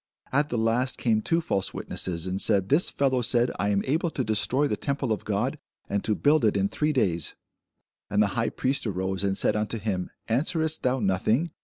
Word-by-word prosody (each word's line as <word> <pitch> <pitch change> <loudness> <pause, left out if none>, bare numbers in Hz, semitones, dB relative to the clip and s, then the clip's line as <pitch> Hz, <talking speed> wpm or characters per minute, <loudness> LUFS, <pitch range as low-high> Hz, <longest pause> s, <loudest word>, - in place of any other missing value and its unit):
At 145 +2 +2
the 120 - -1
last 115 +3 +1
came 110 -3 +1
two 165 +8 +1
false 95 - -1
witnesses, 85 -2 -3
and 95 +1 -2
said, 100 -3 +2
This 155 +6 +3
fellow 130 -2 +1
said, 120 +1 +2
I 100 - +1
am 100 -1 +1
able 160 +6 +1
to 135 - -2
destroy 125 +6 +1
the - - -1
temple 140 -3 -2
of 110 - -2
God, 120 +8 -1 0.3
and 100 0 -1
to 105 - +1
build 145 +3 +3
it 105 -2 +3
in 100 0 +1
three 150 0 0
days. 90 - 0 0.7
And 100 - 0
the 105 - +6
high 115 -1 0
priest 130 -2 -1
arose, 95 0 -2
and 95 -1 0
said - - +2
unto 105 +1 -1
him, 95 -4 -2 0.2
Answerest 160 +6 0
thou 130 +1 +1
nothing? 110 - +1
115 Hz, 205 wpm, -26 LUFS, 100-140 Hz, 0.7 s, the